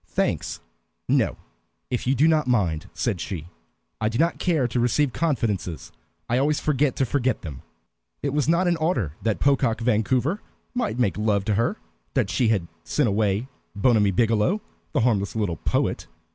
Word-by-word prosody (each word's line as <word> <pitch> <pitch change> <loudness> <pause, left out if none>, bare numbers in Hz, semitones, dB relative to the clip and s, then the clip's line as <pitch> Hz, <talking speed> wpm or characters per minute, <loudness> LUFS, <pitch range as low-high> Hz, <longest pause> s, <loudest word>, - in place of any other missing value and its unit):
"Thanks - - -1 0.5
no, - - +2 0.5
if 125 0 -2
you 135 - +3
do 145 +5 +4
not 155 -3 +3
mind," 100 -7 +1
said 110 -9 -2
she. 85 -5 -5 0.5
"I 110 - +2
do 115 - -3
not 165 +4 +1
care 160 -8 +2
to 120 +1 -1
receive 125 +3 +2
confidences, 110 - -1 0.4
I 120 +2 +2
always 145 +2 +2
forget 145 -2 +1
to 135 - +1
forget 130 -1 0
them." 75 -6 -7 0.6
It 140 - -1
was 150 0 +1
not 170 +3 +3
in 170 -1 +2
order 145 - 0
that 110 -2 0
Pocock 135 -5 +2
Vancouver 125 - +1 0.3
might 240 - -1
make 105 -5 +1
love 105 -2 +1
to 110 - +1
her 120 - +1 0.4
that 115 -8 +1
she 120 +6 +2
had 100 -6 +1 0.2
sent 145 -7 +1
away 105 +3 +1 0.3
Bonamy 105 -1 +3
Biggielow, 115 - +2 0.3
the - - +1
harmless 105 -4 +1
little 100 -7 -1
poet. - - -1
120 Hz, 170 wpm, -24 LUFS, 105-145 Hz, 0.6 s, do